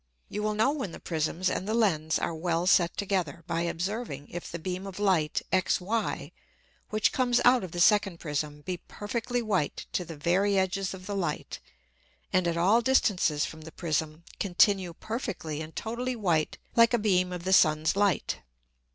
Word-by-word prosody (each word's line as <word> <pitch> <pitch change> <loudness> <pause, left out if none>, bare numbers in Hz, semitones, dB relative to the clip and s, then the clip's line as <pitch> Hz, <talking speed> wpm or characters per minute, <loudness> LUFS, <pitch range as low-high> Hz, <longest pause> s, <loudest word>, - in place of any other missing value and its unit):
You 210 - -3
will 215 0 0
know 225 +6 +3
when 265 - -4
the - - -8
Prisms 165 +2 -1
and 190 - -1
the 220 - 0
Lens 160 -9 +2
are - - -2
well 165 +1 -1
set 175 -2 +3
together, 185 -6 -2
by 165 0 -1
observing 170 - -3
if 175 - -7
the 170 - -4
beam 185 +3 -4
of 190 - -8
Light 185 -7 +1
XY, 190 +4 0 0.6
which 215 0 +2
comes 245 -2 +2
out 245 -2 +6
of 185 - -6
the 175 - -5
second 195 -2 +4
Prism 150 -1 -3
be 180 +3 -4
perfectly 235 +6 -3
white 190 -9 -1
to 180 - -1
the 165 -2 -9
very 190 +6 +2
edges 190 0 0
of 185 0 -12
the 205 0 -4
Light, 170 -6 -3 0.7
and 185 -1 +3
at 170 0 0
all 200 +8 +4
distances 200 - +2
from 160 - -9
the 160 +1 -10
Prism 155 -1 -2 0.2
continue 190 -1 +3
perfectly 200 - -4
and 160 0 -8
totally 245 +3 -3
white 170 -8 0 0.2
like 230 +1 +6
a - - +2
beam 185 -4 +2
of 180 -1 -5
the 190 +1 +1
Sun's 155 -2 +4
Light. 200 -2 +1
185 Hz, 180 wpm, -28 LUFS, 165-210 Hz, 0.7 s, out